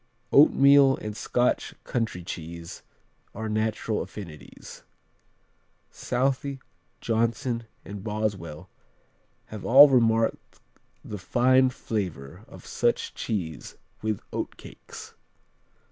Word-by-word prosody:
Oatmeal 140 -1 +6
and 105 -1 -6
Scotch 120 +3 0
country 115 -7 -3
cheese 85 -1 -8 0.5
are 110 - -4
natural 110 0 -1
affinities. 85 -8 -10 1.1
Southey, 135 +2 -1 0.4
Johnson 115 +1 -1 0.2
and 100 -1 -8
Boswell 105 -7 -4 0.8
have 105 -2 -8
all 140 +4 +9
remarked 115 -3 +1 0.5
the 105 - -6
fine 130 +5 +3
savor 90 - -5
of - - -14
such - - -1
cheese 85 -8 -4 0.3
with 110 -2 -2
oatcakes. - - -8
110 Hz, 85 wpm, -26 LUFS, 100-125 Hz, 1.1 s, all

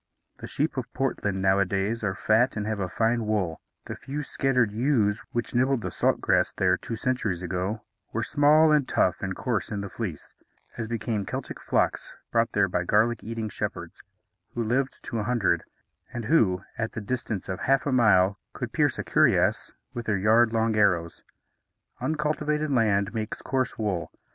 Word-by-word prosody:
The - - -7
sheep 150 0 -1
of 125 - -4
Portland, 100 -7 -1
nowadays, 100 +3 +1
are 95 -2 -1
fat 115 +4 +2
and 105 - -2
have 110 -1 -2
fine 115 0 +1
wool; 95 -7 -1 0.2
the - - -6
few 145 +2 -5
scattered 125 -5 +1
ewes, 110 -3 +1
which 120 -1 -3
nibbled 130 0 +2
the - - -4
salt - - +1
grass - - +2
there - - +2
two 115 - -6
centuries 110 -7 -1
ago, 95 +4 -3 0.3
were 115 - -2
small 155 +2 +5
and 150 -3 +3
tough 90 - +1
and 95 -1 -3
coarse 120 -5 -2
in 105 -2 -3
the 100 - -6
fleece, 95 -10 -6 0.4
as 115 -2 -4
became 110 -2 -2
Celtic - - -5
flocks - - 0 0.2
brought 115 0 +1
there 100 -1 +3
by 90 -1 -1
garlic 110 +5 +2
eating 115 0 -4
shepherds, - - -5 0.5
who 120 - 0
lived 130 +4 -1
to 115 - -3
a - - -1
hundred, 110 -8 +1 0.5
and 120 -3 -5
who, 100 - +3 0.2
at 110 0 -2
the - - -4
distance 110 -2 -3
of 95 -1 -4
half 135 0 +2
a 145 - 0
mile, 100 -5 +4
could - - -5
pierce - - +2
a - - -3
cuirass - - +2 0.2
with 120 -1 -6
their 105 -2 +2
yard 110 +4 +4
long 115 -1 +1
arrows. 90 -6 +1 0.8
Uncultivated 150 0 -1
land 105 -6 +2
makes 110 -1 -4
coarse 130 -2 -1
wool. 100 -6 -2
110 Hz, 175 wpm, -26 LUFS, 100-125 Hz, 0.8 s, small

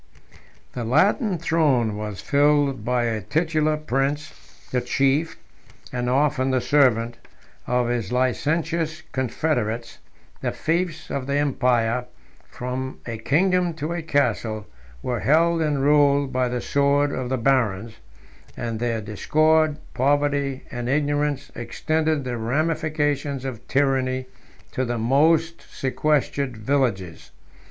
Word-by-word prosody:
The 125 - -4
Latin 185 - +2
throne 145 -9 +1
was 105 -2 -5
filled 145 -4 +2
by 125 +1 +1
a 115 -2 -1
titular 155 - 0
prince, 145 +1 -1 0.4
the 125 - +1
chief, 140 +6 +1 0.6
and 125 0 -1
often 135 0 +2
the 130 -1 +2
servant, 120 -4 +2 0.5
of 125 -1 +1
his 120 -5 -2
licentious 155 +5 0
confederates; 120 -3 -2 0.4
the - - -1
fiefs 165 -1 -2
of 135 -1 -3
the 140 - 0
empire, 125 -4 +1 0.4
from 130 +1 -5
a 115 -2 -5
kingdom 180 +6 +2
to 155 +2 -3
a 170 - -3
castle, 115 -8 0 0.4
were 120 -2 -1
held 165 - +3
and 145 -3 0
ruled 145 -1 +3
by 130 0 +1
the 125 0 -2
sword 140 0 +2
of 130 -2 -3
the 130 - 0
barons; 115 -4 +1 0.6
and 115 -2 -3
their 115 -2 -1
discord, 155 +9 +2 0.2
poverty, 140 0 +1
and 120 0 -4
ignorance, 145 0 0
extended 155 +5 -1
the 125 -2 -3
ramifications 145 +1 -1
of 125 -4 -6
tyranny 130 -2 +1 0.5
to 130 - -1
the 120 -1 -2
most 160 +8 +2
sequestered 140 -2 0
villages. 110 - -1
135 Hz, 120 wpm, -23 LUFS, 120-150 Hz, 0.6 s, held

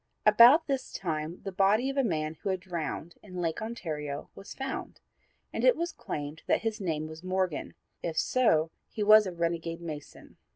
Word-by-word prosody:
About 235 +9 +8
this 270 -2 -2
time 160 -1 -3
the 195 - -4
body 200 +6 +3
of - - -8
a 275 - +3
man 155 -7 -1
who - - -2
had 190 -1 0
drowned 170 -1 -4
in 185 -3 -8
Lake 165 +1 -1
Ontario 155 -11 -5
was 195 - -10
found, 270 0 -5 0.5
and - - -2
it - - +6
was 340 +1 -2
claimed 145 +1 -6
that - - +2
his 225 -1 -2
name 155 -4 -1
was 160 0 -9
Morgan; 185 -2 -2 0.3
if 165 -2 -4
so, 165 -11 +3 0.2
he 215 - -3
was 215 0 +7
a - - -3
renegade 170 -1 -2
mason. 155 -4 -9
180 Hz, 180 wpm, -29 LUFS, 160-215 Hz, 0.5 s, About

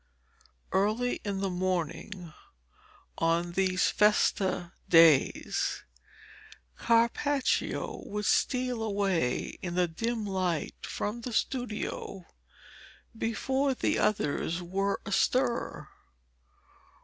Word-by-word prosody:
Early 215 +6 +1
in 200 -2 -3
the 195 - 0
morning 180 -1 -3 0.9
of 170 +1 +1
these 185 0 +2
festa 195 -4 +2 0.2
days, 165 -5 +4 0.9
Carpaccio 235 +4 +1
would 210 0 -3
steal 250 -2 +1
away 195 - -1
in 175 -1 -4
the 180 -1 +3
dim 225 +6 -3
light 185 -5 -1
from 215 +3 -3
the 245 - -5
studio, 220 -6 -3 0.9
before 265 +5 0
the - - 0
others 170 -3 0
were 195 +3 -1
astir. 240 +4 0
200 Hz, 85 wpm, -29 LUFS, 175-230 Hz, 0.9 s, days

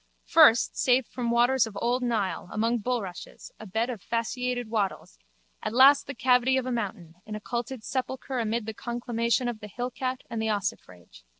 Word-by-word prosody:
First, 300 -8 +5
saved 250 -1 +3
from 245 -2 -3
waters 240 +1 +3
of 210 - -9
old 245 +2 0
Nile, 215 -7 -1
among 230 +2 0
bulrushes, 210 -6 -5
a 220 - -9
bed 220 +5 0
of 225 -6 -7
fasciated 245 +2 -2
wattles: 200 - -3 0.4
at - - -3
last 275 +2 +7
the 280 - -6
cavity 250 +2 +3
of 260 - -1
a 255 - -2
mountain, 195 -8 -4
an 215 - -5
occulted 235 +2 -4
sepulchre 260 0 -3
amid 225 0 -1
the 220 - -5
conclamation 235 +1 -1
of 240 -3 -3
the 210 - -8
hillcat 250 +3 -4
and 230 -1 -4
the 220 - -1
ossifrage. 90 - -5
235 Hz, 175 wpm, -27 LUFS, 215-250 Hz, 0.4 s, last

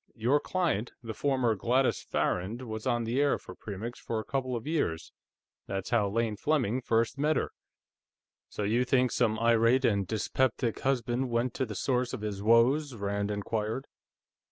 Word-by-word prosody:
Your 125 +6 +2
client, 155 - -1
the 115 -1 -5
former 130 -3 +1
Gladys 125 +6 +1
Farrand, 105 +8 -1
was 110 -1 -5
on 120 -2 +1
the 120 +5 0
air 145 - +3
for - - -11
Premix 105 +5 -7
for 115 - -3
a - - -4
couple 130 -1 -2
of 115 - -5
years; 145 - -1 0.6
that's 95 +2 -4
how 110 -4 +3
Lane 115 +1 0
Fleming 130 -4 +1
first 115 +2 +1
met 155 +2 +2
her." - - -1 1.0
"So 105 - -4
you 115 +5 +2
think 125 -1 +2
some 110 -3 +1
irate 115 +3 +4
and 100 -4 +2
dyspeptic 115 +1 0
husband 125 -1 0
went 120 +1 0
to 130 - -2
the 105 - -6
source 125 +4 0
of 125 - -4
his 105 -2 -4
woes?" 120 +6 +4
Rand 100 -1 -2
inquired. 105 +4 -2
115 Hz, 170 wpm, -29 LUFS, 110-130 Hz, 1.0 s, irate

